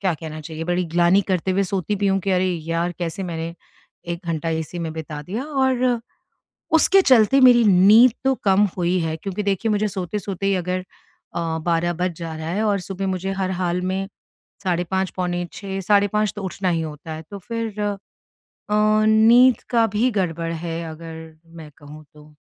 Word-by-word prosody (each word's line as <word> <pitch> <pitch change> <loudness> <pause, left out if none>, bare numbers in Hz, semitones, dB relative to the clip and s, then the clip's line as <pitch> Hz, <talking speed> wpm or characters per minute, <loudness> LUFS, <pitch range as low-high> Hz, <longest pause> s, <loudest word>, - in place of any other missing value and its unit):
क्या 190 -3 +1
कहना 155 0 -8
चाहिए 160 +1 -6
बड़ी 175 +1 0
ग्लानि 175 +3 +4
करते 185 0 0
हुए 195 +2 +2
सोती 190 +1 -2
भी 200 0 0
हूँ 195 0 +2
कि 195 +1 -2
अरे 185 0 +2
यार 170 0 -2
कैसे 175 +3 -3
मैंने 165 -1 -4 0.6
1 170 +2 -7
घंटा 165 0 -2
इसी 160 +1 -4
में 160 -1 -4
बिता 155 -2 -6
दिया 210 - -4
और 260 -4 +1 0.7
उसके 385 +4 +5
चलते 255 - +5
मेरी 245 -2 +7
नींद 210 +5 +6
तो 270 - +3
कम 200 +1 +4
हुई 180 0 +1
है 160 -1 -2
क्योंकि 195 +4 -4
देखिए 200 +3 0
मुझे 210 +1 +1
सोते-सोते 195 +1 -4
ही 195 - +2
अगर, 180 +1 -2 0.5
अ, 165 -1 -2
12 175 0 +1
बज 180 +1 -1
जा 165 -1 -5
रहा 160 0 -5
है 200 +6 -1
और 205 -3 +1
सुबह 195 +1 -5
मुझे 190 +1 -2
हर 190 -1 -2
हाल 180 -1 0
में 190 +1 -2 0.6
साढ़े 175 -1 0
5 190 0 0
पौने 175 -1 -2
6 195 -1 -5
साढ़े 205 +1 +3
5 210 0 0
तो 205 - -5
उठना 190 0 -2
ही 165 -2 +1
होता 155 +1 -7
है। 155 +1 -7
तो 200 - -7
फ़िर 225 +1 -5
अ, 205 -1 -1 1.1
नींद 230 +3 +5
का 230 -2 +3
भी 225 +5 +1
गड़बड़ 165 -5 -2
है 165 0 -4
अगर 160 0 -10 0.2
मैं 155 -2 -10
कहूँ 150 +1 -12
तो। 150 0 -17
185 Hz, 190 wpm, -22 LUFS, 165-205 Hz, 1.1 s, मेरी